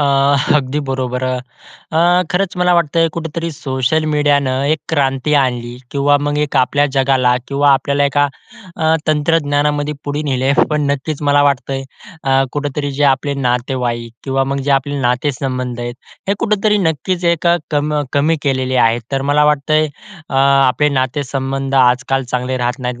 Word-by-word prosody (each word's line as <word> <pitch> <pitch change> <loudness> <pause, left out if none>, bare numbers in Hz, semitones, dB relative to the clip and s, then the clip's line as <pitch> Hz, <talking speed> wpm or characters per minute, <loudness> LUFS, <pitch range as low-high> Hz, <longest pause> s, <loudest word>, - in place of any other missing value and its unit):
आह, 140 -1 +2
अगदी 140 +1 -1
बरोबर. 130 -1 -2
अ, 130 +5 -6 0.3
खरंच 180 0 -1
मला 180 0 +3
वाटतं 165 0 +2
कुठेतरी 165 0 -4
सोशल 135 +3 -1
मिडियाने 145 -3 +2 0.2
एकक्रांती 145 -2 0
आणली 120 -2 -2
किंवा 145 +1 +2
मग 145 0 -1
एक 145 - -4
आपल्या 145 +3 +2
जगाला 130 -2 +3
किंवा 140 +1 +2
आपल्याला 140 +1 +1
एका 145 +1 +2 0.5
अ, 160 - -3 0.2
तंत्रज्ञानामध्ये 150 -1 +1
पुढे 145 +1 -2
नेलय. 135 -1 0 0.2
पण 150 0 0
नक्कीच 145 +2 -3
मला 145 0 +4
वाटतंय 135 -1 0 0.4
अ, 135 - 0 0.2
कुठेतरी 145 0 -3
जे 145 +2 0
आपले 140 +1 +1
नातेवाईक 125 -2 -2
किंवा 135 0 0
मग 140 +1 -2
जे - - +1
आपले 140 +1 +1
नाते-संबंध 125 -1 -2
आहेत, 120 0 -4 0.3
हे 200 - +2
कुठेतरी 210 -1 +1
नक्कीच 175 +1 -1
एक 170 0 -3 0.2
कम 150 0 0 0.2
कमी 155 +3 +2
केलेले 130 -2 0
आहेत. 115 +1 0
तर 135 0 0
मला 150 +1 +4
वाटतंय 150 +1 +2 0.4
अ, - - -5
आपले 135 0 +3
नाते-संबंध 135 0 -2
आजकाल 125 +1 +2
चांगले 125 +1 -1
राहत 125 +2 -2
नाहीत. 125 -1 -4
140 Hz, 150 wpm, -16 LUFS, 130-150 Hz, 0.5 s, मला